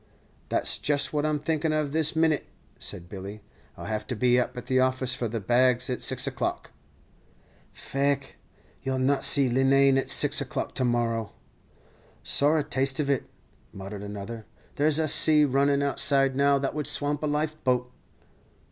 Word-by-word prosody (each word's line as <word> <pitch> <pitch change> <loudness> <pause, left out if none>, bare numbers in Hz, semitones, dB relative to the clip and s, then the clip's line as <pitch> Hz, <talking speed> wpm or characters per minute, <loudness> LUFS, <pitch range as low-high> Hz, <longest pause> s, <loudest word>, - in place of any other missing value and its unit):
"Then - - +1
that's - - 0
just 145 0 +1
what 150 0 0
I'm 155 -1 0
thinking 155 +1 -1
of 155 -2 -1
this 160 +1 +2
minit," 160 -2 +1 0.3
said 85 - -6
Billy. 100 +2 -8 0.4
"I'll - - -8
have 110 -1 -4
to 125 - -3
be 125 +2 +3
up 125 +1 -3
at 125 - -6
the 130 0 +1
office 130 -1 +1
for 125 -2 -2
the 115 +1 -4
bags 125 +4 +2
at 125 - -3
six - - 0
o'clock." - - -3 1.0
"Faix, 140 0 -2 0.5
you 135 0 -2
'll - - -2
not 135 +2 +1
see 140 -2 +5
Leenane 135 +2 +3
at - - -4
six - - +1
o'clock - - -4
to 130 - -1
morrow." 115 -3 -1 0.9
"Sorra 150 +2 +2
taste 135 0 -1
of 140 -2 0
it," 135 - -1 0.5
muttered 100 +1 -8
another; 105 +2 -7 0.3
"there's 150 +1 +2
a 160 -1 +1
sea 150 0 +5
runnin' 140 +1 +1
outside 135 -1 +1
now 140 0 +3
that 135 0 -2
would 150 -1 -3
swamp 145 0 -1
a 155 - -1
life 155 +1 -2
boat." 125 -1 0
135 Hz, 175 wpm, -26 LUFS, 125-145 Hz, 1.0 s, see